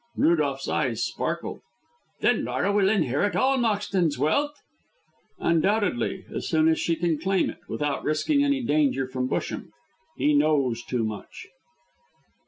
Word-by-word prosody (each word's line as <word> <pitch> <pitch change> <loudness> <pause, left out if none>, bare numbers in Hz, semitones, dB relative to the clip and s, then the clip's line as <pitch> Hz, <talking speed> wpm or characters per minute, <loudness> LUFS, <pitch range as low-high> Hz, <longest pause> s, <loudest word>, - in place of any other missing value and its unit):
Rudolph's 145 -5 +1
eyes 120 -6 0
sparkled. - - -4 0.6
"Then - - +2
Laura 200 - 0
will 200 -1 +3
inherit 190 - +1
all 265 +8 +2
Moxton's 200 - 0
wealth?" 280 - +1 0.8
"Undoubtedly, 185 - 0
as - - -4
soon 160 -1 +3
as 160 - +2
she 165 - +1
can 165 -2 0
claim 190 +3 +1
it, - - -15
without 145 -1 -2
risking 280 - +1
any 280 -2 +1
danger 145 - +1
from 130 0 -3
Busham. - - -3 0.5
He 300 0 +2
knows 140 - +2
too 125 -2 -2
much." 110 -2 -6
160 Hz, 135 wpm, -25 LUFS, 140-205 Hz, 0.8 s, will